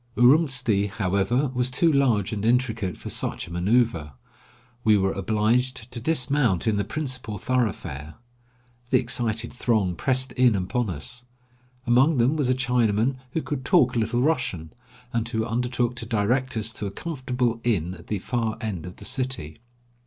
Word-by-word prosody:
Urumtsi, 125 -6 +4
however, 100 +7 0
was 125 0 +1
too 160 +6 +2
large 120 -8 +2
and 105 -1 -3
intricate 115 -6 +1
for - - -7
such - - -2
a - - -11
manceuver. 90 - +1 0.7
We 110 -3 +5
were 95 0 +1
obliged 110 +5 0
to 120 - -4
dismount 130 - +1
in 110 -2 +2
the 100 - +1
principal 130 -2 -4
thoroughfare. 95 - -2 0.7
The - - +5
excited 115 -2 -1
throng 110 -7 +1
pressed 130 +7 0
in 125 -3 +3
upon 100 +5 -1
us. 120 +10 -4 0.6
Among 130 +5 +4
them 125 +5 +3
was 145 -5 0
a 130 - +3
Chinaman 125 -1 +1 0.2
who 160 - -1
could 140 -3 -4
talk - - +3
a - - +2
little 115 +2 0
Russian, 110 - -1 0.4
and 115 -1 -1
who 110 -2 -1
undertook 120 +1 -1
to 115 - -5
direct 120 +3 0
us 110 +1 -1
to 105 - -4
a - - -3
comfortable 125 -4 -2
inn 95 -7 0
at 85 -3 -13
the 105 - -1
far 115 +2 -2
end 95 -7 -4
of 90 - -9
the - - -11
city. 130 - -3
120 Hz, 165 wpm, -25 LUFS, 105-130 Hz, 0.7 s, We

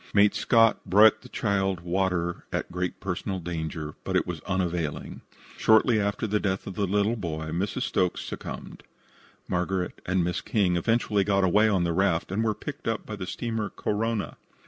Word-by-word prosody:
Mate 100 0 +6
Scott 115 -2 +3
brought 110 +3 +6
the - - -13
child 95 -4 0
water 90 -1 -1
at - - -3
great 90 +1 -3
personal 95 +1 -3
danger, 80 -3 -4
but - - -2
it - - +3
was 85 -3 -5
unavailing. 90 -5 -2 0.4
Shortly 110 +1 +4
after 100 +2 -1
the 105 0 +1
death 95 -2 -1
of 95 - -5
the 100 +1 -1
little 105 +4 +2
boy 80 -6 -4
Mrs. 95 +5 -1
Stokes 90 -1 0
succumbed. - - -7 0.7
Margaret 90 0 -2
and 95 -1 +2
Miss 90 0 -1
King 100 -7 +1
eventually 105 +2 +2
got 100 -1 +2
away 105 +4 +4
on 95 -4 +2
the 85 -1 0
raft, 90 -1 +1
and 105 +4 0
were 110 -2 +1
picked 145 -5 -7
up 115 -1 -1
by 105 - -5
the 95 -3 -6
steamer 110 -1 -3
Korona. 110 0 -2
95 Hz, 175 wpm, -27 LUFS, 90-105 Hz, 0.7 s, Mate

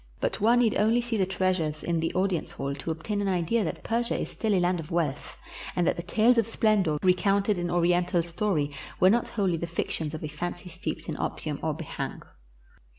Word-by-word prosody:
But - - -1
one 230 +3 +5
need 225 -3 +2
only 220 +3 +4
see 240 -1 -2
the 190 -3 +1
treasures 180 -5 0
in 170 -1 0
the 165 - 0
audience 185 -3 0
hall 140 0 -4
to 140 +4 -6
obtain 185 +6 -2
an 200 - 0
idea 185 +4 +1
that 165 - -4
Persia 235 +1 0
is - - -4
still 215 -3 0
a - - +3
land 175 0 +1
of 155 -1 -7
wealth, 160 -5 -2 0.4
and 175 - +2
that - - +2
the 170 - -4
tales 225 +7 +3
of 225 - +1
splendor 210 -9 +2
recounted 195 +2 +3
in 175 0 -2
Oriental 175 0 +2
story 170 -4 -1 0.3
were 185 +1 +6
not 235 +2 +2
wholly 190 -6 0
the 170 - -3
fictions 160 -2 -3
of 155 - -7
a - - -2
fancy 175 +4 -5
steeped 165 - -5
in - - -3
opium - - -3
or - - -1
b'hang. - - -5
180 Hz, 215 wpm, -27 LUFS, 165-210 Hz, 0.4 s, were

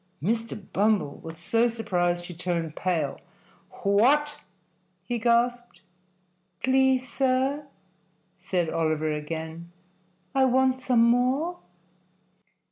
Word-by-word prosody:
Mr. 225 +6 -2 0.2
Bumble 205 -7 +1
was 165 0 -9
so 225 +8 +2
surprised 175 -7 -1
he 175 - -7
turned 170 -2 -3
pale. 160 -7 -1 0.6
"What!" 275 +9 +3 0.6
he 235 +5 -3
gasped. 240 -3 +1 0.8
"Please, 260 0 +3
sir," 265 +3 0 0.7
said 180 -2 -1
Oliver 155 -1 0
again, 160 +2 -5 0.6
"I 270 -1 +4
want 260 0 +2
some 250 -3 +3
more." 255 +9 +2
225 Hz, 95 wpm, -26 LUFS, 170-255 Hz, 0.8 s, I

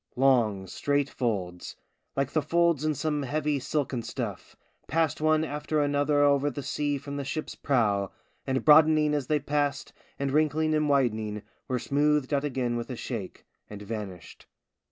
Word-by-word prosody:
Long, 120 -7 +3
straight 145 +8 -1
folds, 95 -8 -3 0.4
like 135 -1 0
the 155 - +1
folds 170 0 +2
in 155 -1 +1
some 150 +1 -1
heavy 145 +1 -1
silken 135 -2 -2
stuff, 115 -4 -6 0.3
passed 160 -1 0
one 155 0 +3
after 150 0 -2
another 145 0 +2
over 140 0 +3
the 145 0 -6
sea 145 0 -1
from 140 +1 -6
the 140 - -3
ship's 150 +3 -4
prow, 105 -8 +1 0.4
and 130 0 -1
broadening 155 0 +6
as 145 -4 -1
they 155 - +2
passed, 145 0 -1 0.2
and 140 -1 -1
wrinkling 155 +1 +2
and 150 -1 +1
widening, 110 -6 0 0.2
were 130 - 0
smoothed 145 +2 +1
out 140 0 +1
again 125 -4 -1
with 120 - -5
a 125 - -4
shake, 115 -5 -6 0.2
and 105 -1 -8
vanished. 100 -5 -7
140 Hz, 160 wpm, -27 LUFS, 120-150 Hz, 0.4 s, broadening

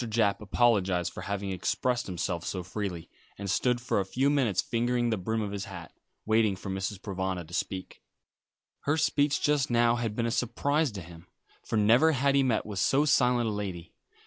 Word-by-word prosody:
Japp 105 -3 +1
apologised 100 -5 +1
for - - -7
having 100 -1 -3
expressed 120 +6 -1
himself 90 -1 -3
so 90 0 -4
freely, 95 -3 -5 0.3
and 100 - -5
stood 120 +6 +1
for 120 -3 0
a - - +1
few 130 +9 +1
minutes 120 -10 +1
fingering 120 +2 0
the 110 - +1
brim 110 +4 -2
of 100 - -4
his 100 -1 -4
hat, 85 -4 -9 0.3
waiting 110 -2 +3
for 95 +1 -6
Mrs. 95 +2 -3
Provana 95 -3 -3
to 85 - -14
speak. 95 +1 -4 0.8
Her 145 +3 +2
speech 145 -2 +2
just 150 -1 +2
now 120 0 +3
had 115 -3 -2
been 115 - 0
a 115 - 0
surprise 140 +5 0
to 100 - -6
him, 85 0 -13 0.4
for - - -2
never 120 +10 +5
had 140 0 +2
he 140 - +4
met 125 -5 +1
with 105 -3 -4
so 140 +7 +3
silent 125 -4 +3
a - - 0
lady. 95 -5 -5
110 Hz, 195 wpm, -28 LUFS, 95-125 Hz, 0.8 s, never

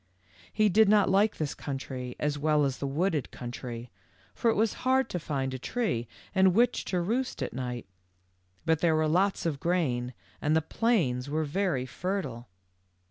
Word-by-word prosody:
He 215 -1 +3
did 215 +1 +5
not 205 -2 +5
like 205 +3 +3
this 150 -2 -2
country 130 -3 -5
as 150 0 0
well 150 0 +2
as 135 -1 -2
the 140 - -2
wooded 155 0 0
country, 120 -1 -7 0.4
for 235 - +1
it 225 - +2
was 220 +1 +2
hard 260 +1 +2
to 180 - -2
find 135 -4 -2
a 130 - -4
tree 130 - -1 0.3
in 190 -2 +5
which 240 +4 +2
to 180 - 0
roost 235 +9 -1
at - - -4
night, 125 -2 -4 0.8
but 160 -1 +3
there 165 -2 +3
was 155 -1 +2
lots 190 +3 +2
of 150 -4 -1
grain, 130 -9 0 0.3
and 150 +1 +2
the 160 - +4
plains 150 - +1
were 155 +2 0
very 155 -4 0
fertile. 135 -6 -4
155 Hz, 175 wpm, -29 LUFS, 130-195 Hz, 0.8 s, did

